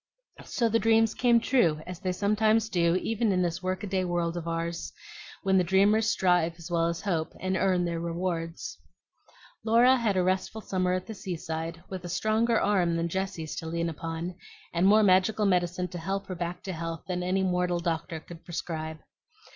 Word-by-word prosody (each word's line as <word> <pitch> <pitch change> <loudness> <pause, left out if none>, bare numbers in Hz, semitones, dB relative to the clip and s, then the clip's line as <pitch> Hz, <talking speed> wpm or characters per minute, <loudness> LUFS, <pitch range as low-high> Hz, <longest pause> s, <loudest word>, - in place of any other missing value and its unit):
So 235 - 0
the 230 0 +2
dreams 225 0 +3
came 240 -1 +4
true, 230 - +2
as 180 -1 -7
they 185 -2 -1
sometimes 215 +3 +2
do 170 -4 +2
even 225 +3 0
in 180 -1 +2
this 170 0 -2
work 185 +1 -2
a - - -1
day 190 -1 0
world 175 -1 -1
of 170 -1 -5
ours, 165 0 -3 0.5
when 190 -1 +4
the - - +3
dreamers 205 +5 +3
strive 175 -4 +2
as 170 0 -10
well 165 -1 +2
as 170 0 -3
hope, 165 -5 -1
and 185 0 -1
earn 185 -2 +2
their 170 -1 -2
rewards. 170 -1 -3 0.8
Laura 240 +4 +5
had 220 -5 0
a 185 - +3
restful 190 +4 -1
summer 185 -3 0
at 185 0 -2
the 220 - -7
seaside, 165 -3 -5
with 185 -2 -6
a 175 - -6
stronger 220 +5 +2
arm 180 -5 +2
than 170 0 -1
Jessie's 190 -3 -3
to 160 - -5
lean 170 +1 -1
upon, 165 +2 -5 0.4
and 175 +2 +3
more 215 +2 +6
magical 200 +3 +3
medicine 180 -1 +1
to 175 - -6
help 195 +4 -3
her 185 - -5
back 175 +1 -4
to 190 - -4
health 165 -1 -5
than 180 -1 -2
any 185 +2 0
mortal 180 -1 +1
doctor 165 -1 -2
could 165 +1 -12
prescribe. 160 -2 -4
180 Hz, 195 wpm, -28 LUFS, 170-200 Hz, 0.8 s, more